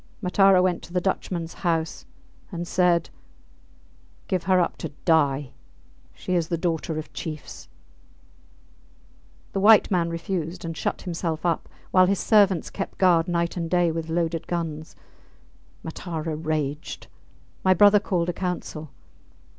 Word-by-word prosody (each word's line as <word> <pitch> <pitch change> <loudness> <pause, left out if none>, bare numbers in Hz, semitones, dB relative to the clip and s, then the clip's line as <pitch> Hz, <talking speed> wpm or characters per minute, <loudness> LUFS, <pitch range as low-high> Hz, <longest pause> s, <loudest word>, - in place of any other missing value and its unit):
Matara 190 -1 +4
went 180 -2 +1
to 175 - -12
the 180 - +2
Dutchmans 175 -2 -2
house, 165 -3 -1 0.4
and 175 -1 -5
said, 175 -2 +2 1.2
Give 185 -3 -1
her 185 0 +4
up 175 - 0
to 160 - -5 0.2
die 145 -5 +2 0.6
she 185 - -4
is 170 -3 +1
the 170 - -1
daughter 165 -1 -2
of 155 - -7
chiefs. 155 -2 -7 1.8
The 195 - -2
white 210 +1 +6
man 170 -3 +1
refused 170 0 -4
and 165 -1 -4
shut - - -3
himself 170 -2 -3
up, 170 -2 0 0.2
while 185 -1 +5
his 200 +1 +2
servants 200 -6 +3
kept 195 - -5
guard 175 -3 +4
night 170 -1 -1
and 170 -2 -3
day 175 -1 +2
with 165 0 -4
loaded 165 0 -1
guns. 160 -2 -4 0.9
Matara 160 -1 -4
raged. 155 -1 -3 0.6
My 185 0 +5
brother 205 +3 +7
called 180 -4 -1
a - - -1
council. 170 -4 -4
170 Hz, 140 wpm, -25 LUFS, 160-185 Hz, 1.8 s, brother